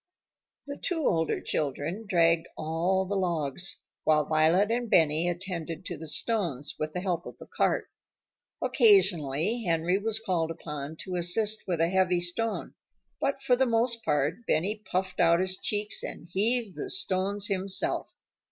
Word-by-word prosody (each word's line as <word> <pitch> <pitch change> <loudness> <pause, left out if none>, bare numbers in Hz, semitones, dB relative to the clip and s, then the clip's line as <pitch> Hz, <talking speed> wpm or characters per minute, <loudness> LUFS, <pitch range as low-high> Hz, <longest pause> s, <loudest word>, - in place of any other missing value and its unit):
The 285 0 -7
two 345 -3 -2
older 160 -1 +1
children 155 +9 -3
dragged 165 -3 +2
all 170 +5 0
the 200 +2 -3
logs, 175 -2 -1 0.2
while 150 -1 +3
Violet 160 +7 +3
and 240 0 -1
Benny 160 0 +3
attended 175 -2 -5
to 175 - -4
the 160 +1 -9
stones, 155 - 0
with 155 0 -3
the 180 - -3
help 180 -3 -2
of - - -10
the - - -12
cart. - - -1 0.8
Occasionally 195 - +3
Henry 170 +1 +1
was 220 +1 +1
called 180 -7 -1
upon 150 -2 -6
to 185 -1 -4
assist 210 +5 +2
with 175 -3 -1
a 165 +1 +2
heavy 185 -1 +2
stone, 195 +6 -2 0.5
but 275 0 -2
for 255 -2 +3
the 260 +1 +1
most 230 0 +1
part 150 - 0
Benny 200 +7 0
puffed 185 0 -2
out 170 -1 +4
his 185 0 +1
cheeks 210 +2 0
and - - -6
heaved 220 +1 +4
the 390 - -4
stones 200 - 0
himself. 195 -1 -1
185 Hz, 155 wpm, -28 LUFS, 165-210 Hz, 0.8 s, out